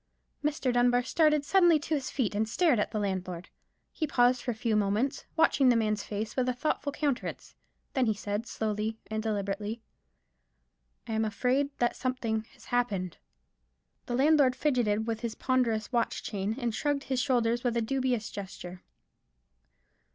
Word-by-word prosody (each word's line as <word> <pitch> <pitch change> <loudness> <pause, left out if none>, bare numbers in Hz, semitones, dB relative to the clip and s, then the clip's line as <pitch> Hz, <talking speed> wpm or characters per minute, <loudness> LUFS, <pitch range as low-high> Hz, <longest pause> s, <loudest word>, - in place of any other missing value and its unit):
Mr. 285 -4 0
Dunbar 245 0 +3
started 300 +1 +3
suddenly 350 -1 +5
to 300 +2 -4
his 280 -3 -1
feet, 240 -7 -1
and 215 +2 0
stared 310 - +3
at - - 0
the 220 - -4
landlord. 185 -3 -3 0.4
He 310 - -2
paused 245 -1 +3
for - - -5
a 240 - -1
few 220 0 0
moments, 210 +7 0
watching 295 -5 +4
the 245 - +5
man's 215 -2 +1
face 215 +2 -4
with 255 -1 +1
a 250 - -1
thoughtful 285 +1 -1
countenance. 280 -3 -3 0.4
Then 260 -3 +2
he 220 - +2
said, 205 +2 -3
slowly 215 0 -2
and 220 0 -1
deliberately,— 210 +1 -3 1.2
"I 225 - -3
am 220 0 +1
afraid 255 +6 +1
that 240 - +1
something 230 -4 -2
has - - -17
happened." 200 -8 0 0.9
The 240 - -1
landlord 275 -1 +4
fidgeted 240 -7 +1
with 225 -1 -2
his 230 -1 -4
ponderous 235 -4 0
watch 240 -2 0
chain, 205 +1 -2
and 240 -4 -2
shrugged 285 +4 -1
his 260 -2 -1
shoulders 240 -3 +1
with 240 -2 0
a - - +2
dubious 255 -2 -1
gesture. 185 -2 -8
240 Hz, 165 wpm, -29 LUFS, 215-260 Hz, 1.2 s, suddenly